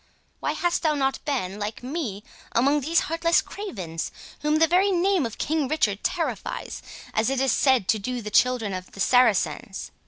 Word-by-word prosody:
Why - - -1
hast 350 -1 0
thou 310 -2 +2
not 270 -1 -1
been, 210 -9 -2
like 210 +3 -4
me, 250 - -4 0.3
among 280 +5 +3
these 325 +5 +2
heartless 330 +1 +2
cravens, 185 - -5 0.3
whom 300 0 +1
the 320 +1 +5
very 365 +5 +3
name 370 -5 +2
of 225 - -10
King 305 -2 0
Richard 215 -9 0
terrifies, 340 -3 -3 0.3
as 220 +2 +2
it 270 -1 0
is 265 -2 +2
said 260 -8 +3
to 220 - +3
do 250 +4 -3
the 210 -2 -6
children 240 -3 +2
of 185 0 -7
the - - -12
Saracens?" 205 - +2
260 Hz, 180 wpm, -25 LUFS, 210-320 Hz, 0.3 s, the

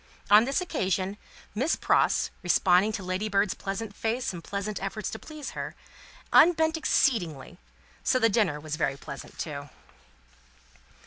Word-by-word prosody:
On 210 +2 +8
this 275 +7 0
occasion, 190 - -1 0.4
Miss 265 +10 +1
Pross, - - +2
responding 180 +3 +3
to 205 - -4
Ladybird's 195 +1 0
pleasant 200 +2 -5
face 230 0 -2
and 170 -2 -8
pleasant 200 +1 -4
efforts 195 +2 -4
to - - -6
please 305 -3 -8
her, - - -6 0.6
unbent 320 -1 +5
exceedingly; 175 - 0 0.4
so 255 - +3
the 230 -3 +4
dinner 200 -9 +1
was 155 0 -5
very 140 -4 0
pleasant, 140 0 -9
too. 145 -2 -5
200 Hz, 135 wpm, -27 LUFS, 175-230 Hz, 0.6 s, On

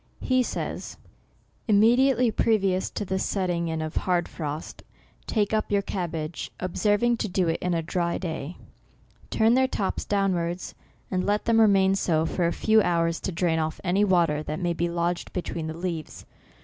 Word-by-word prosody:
He 255 -1 +2
says 250 - -4 0.2
— - - -37
" - - -39
Immediately 240 +3 +4
previous 195 -4 +1
to 210 - -4
the 190 0 -1
setting 175 -4 -1
in 160 -1 -2
of 155 0 -5
hard 175 -2 +1
frost, 155 -1 -6 0.5
take 210 -2 0
up 215 -1 0
your 200 -1 +2
cabbage, 170 -4 -4
observing 210 +6 +1
to 220 - -2
do 185 -1 +1
it 165 - 0
in 180 -1 0
a 165 - -1
dry 170 +1 -1
day; 165 -2 -5 0.7
turn 225 +1 +3
their 260 +1 +4
tops 200 -6 -2
down 195 -2 +1
wards, 175 +1 -3 0.4
and 185 -1 0
let 205 +1 0
them 225 -1 +4
remain 195 -3 +5
so 165 -4 +1
for 170 +1 0
a - - 0
few 220 +3 +3
hours 170 -3 +1
to - - -3
drain 165 -1 0
off 155 0 -2
any 190 +2 +2
water 170 -6 +2
that 155 +1 -4
may 175 -2 0
be 170 +1 -1
lodged 170 +1 -2
be 180 - -2
tween 160 -2 -4
the 160 +1 -5
leaves. 170 -3 -5
180 Hz, 190 wpm, -26 LUFS, 170-205 Hz, 0.7 s, remain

